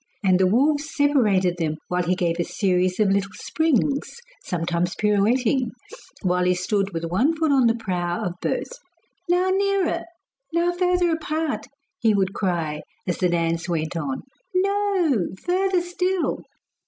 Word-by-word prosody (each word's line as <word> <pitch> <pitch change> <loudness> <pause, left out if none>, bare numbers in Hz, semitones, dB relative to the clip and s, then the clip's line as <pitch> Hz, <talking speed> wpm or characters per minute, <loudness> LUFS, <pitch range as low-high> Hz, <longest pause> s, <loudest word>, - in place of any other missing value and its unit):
And 185 -2 +4
the 190 - +4
wolves 290 +8 +2
separated 210 - +2
them 155 -2 -1
while 180 0 0
he 180 +1 +1
gave 175 -2 -1
a - - +2
series 185 0 0
of 205 -2 +3
little 195 0 0
springs, 295 - 0 0.3
sometime 170 -1 -1
pirouetting 225 +4 +2 0.5
while 180 -1 +2
he 180 0 +3
stood 195 +2 0
with 165 -2 -4
one 230 - +1
foot 315 -2 +1
on 265 -4 +4
the 230 - +3
prow 180 -6 -2
of 180 - -2
both. - - -3 0.5
'Now 360 +2 +3
nearer, 395 -2 +1 0.5
now 340 +1 +2
further 360 -1 +2
apart,' 315 -1 -2 0.3
he 220 -3 +3
would 195 -1 +1
cry 165 -6 -1 0.3
as 175 - -1
the 180 - +2
dance 165 0 0
went 160 -1 -2
on. 145 -5 -3 0.3
'No! 380 - +2 0.2
further 370 0 +2
still. 360 +1 -1
210 Hz, 150 wpm, -23 LUFS, -, 0.5 s, And